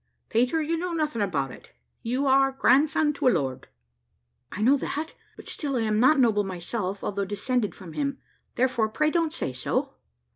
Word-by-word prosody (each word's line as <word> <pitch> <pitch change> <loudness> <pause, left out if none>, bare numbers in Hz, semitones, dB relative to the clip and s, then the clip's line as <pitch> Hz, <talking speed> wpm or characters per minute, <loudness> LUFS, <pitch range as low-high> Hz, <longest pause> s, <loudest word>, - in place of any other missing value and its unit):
"Peter, 250 +8 +2
you 330 +2 -1
know 355 +1 -3
nothing 300 -8 -1
about 145 -10 -1
it; - - -14 0.3
you 255 +5 -1
are 270 0 +4
grandson 295 +3 +3
to 280 - 0
a - - +8
lord." 135 - -1 0.8
"I - - -6
know 265 +5 +6
that, 305 +3 -4 0.2
but - - -13
still 280 -3 -2
I 240 - +1
am 215 -1 +1
not 265 +5 +5
noble 220 -5 +3
myself, 190 +1 -4
although 200 0 -2
descended 205 +1 -1
from 175 -5 -11
him; 280 -1 -2 0.4
therefore 240 -3 +1
pray 300 +8 +1
don't 330 -2 +1
say 220 - -3
so." - - -2
250 Hz, 180 wpm, -26 LUFS, 205-290 Hz, 0.8 s, a